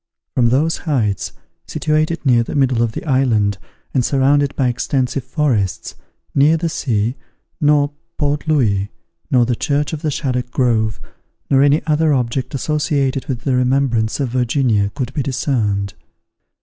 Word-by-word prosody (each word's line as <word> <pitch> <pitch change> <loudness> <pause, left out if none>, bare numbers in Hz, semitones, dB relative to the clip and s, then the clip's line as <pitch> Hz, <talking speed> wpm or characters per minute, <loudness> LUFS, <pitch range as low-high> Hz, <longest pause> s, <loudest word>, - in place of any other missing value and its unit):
From 120 -2 +3
those 150 +7 +1
heights, 110 -9 0 0.4
situated 155 +1 -1
near 120 -3 +4
the 115 - -4
middle 130 -4 +2
of 115 -2 0
the - - -6
island, 115 -8 +1 0.3
and 130 - +2
surrounded 140 +2 +2
by 130 - +1
extensive 125 +1 -1
forests, 115 - -1 0.4
neither 150 +4 +4
the 165 +1 -1
sea, 120 -4 -1 0.4
nor 145 -2 +3 0.3
Port 145 0 -1
Louis, 105 -10 +1 0.4
nor 125 -2 +4
the 120 0 0
church 145 +5 -1
of 155 - -4
the 155 - -1
Shaddock 125 -4 -2
Grove, 115 -5 +1 0.5
nor 135 -1 +5
any 145 +1 +3
other 155 -1 +2
object 125 +1 -2
associated 140 -1 -1
with 125 -4 -3
the 130 -1 0
remembrance 125 -3 +1
of 135 -3 -1
Virginia 120 -4 +1
could 130 -1 -3
de 145 - -1
discerned. 110 -7 -1
130 Hz, 150 wpm, -18 LUFS, 120-145 Hz, 0.5 s, nor